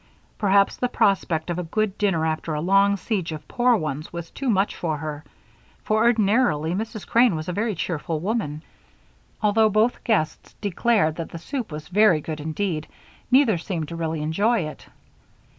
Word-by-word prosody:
Perhaps 200 -1 +3
the 250 - 0
prospect 175 -7 +1
of 175 - -2
a - - -2
good 200 +4 -1
dinner 190 -6 +1
after 160 0 -2
a - - -1
long 195 +4 +3
siege 185 -3 -2
of 155 -1 -7
poor 245 0 +3
ones 155 -5 -4
was 170 -1 -7
too 270 -2 -3
much 200 -2 +1
for 160 -3 -2
her, 150 0 -6 0.6
for 215 - +1
ordinarily 215 -8 +2
Mrs. 215 +1 -4
Crane 235 -5 +4
was 155 0 -5
a 180 - -2
very 210 +2 -1
cheerful 165 -1 -3
woman. 170 -6 -2 0.8
Although 215 +1 +4
both 215 +4 +1
guests 210 -10 -1
declared 205 -4 +1
that 165 - -5
the - - -7
soup 235 - -5
was 150 0 -7
very 195 -3 +4
good 155 +1 -6
indeed, 160 +1 -3 0.4
neither 250 -8 +4
seemed 165 -3 -4
to 170 - -6
really 160 -2 -2
enjoy 205 +9 +1
it. 155 -2 -7
185 Hz, 175 wpm, -24 LUFS, 160-215 Hz, 0.8 s, Crane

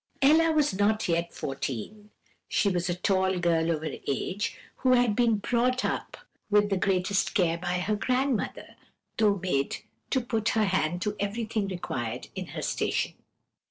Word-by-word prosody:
"Ella 320 +4 +6
was 300 -7 +2
not 205 +3 +1
yet 170 0 0
fourteen; 140 - -5 0.4
she 205 - +2
was 180 -1 -1
a 175 - 0
tall 190 0 +1
girl 170 -2 +2
of 160 -2 0
her 155 - -4
age, 185 +9 -2 0.3
and 255 -1 +5
had 245 -4 +3
been 235 -1 +3
brought 250 +4 +1
up - - -3 0.3
with 205 0 +3
the - - +3
greatest 190 +2 +1
care 170 -5 +2
by 180 0 -1
her 205 +4 0
grandmother, 255 +2 -1 0.4
though 210 -2 +4
made 155 -7 -1 0.3
to 265 - +2
put 225 -3 -1
her 215 - +4
hand 175 -2 0
to 210 0 -1
everything 215 0 -1
required 130 -11 -4
in - - -5
her - - -6
station. - - -1
200 Hz, 160 wpm, -28 LUFS, 175-225 Hz, 0.4 s, Ella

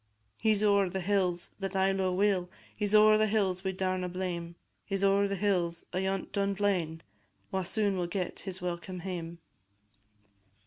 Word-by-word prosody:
He 220 - +3
's 205 - 0
ower 200 -2 +4
the 190 - -3
hills 180 -2 0
that 195 -1 -4
I 190 0 +3
lo'e 190 -1 0
weel, 190 -2 +2 0.3
He 210 - -1
's 210 - +2
ower 215 0 +7
the 215 - +3
hills 195 -3 0
we 190 - 0
daurna 185 -1 -1
name; 175 -2 -4 0.3
He 195 - -3
's 195 - -1
ower 200 +1 +4
the 200 - -2
hills 180 -4 0
ayont 190 +1 -1
Dunblane, 195 -5 0 0.5
Wha 190 - 0
soon 200 +1 0
will 175 -1 -1
get 180 0 -3
his 185 -2 -6
welcome 180 +1 -4
hame. 170 -2 -5
190 Hz, 175 wpm, -30 LUFS, 180-200 Hz, 0.5 s, ower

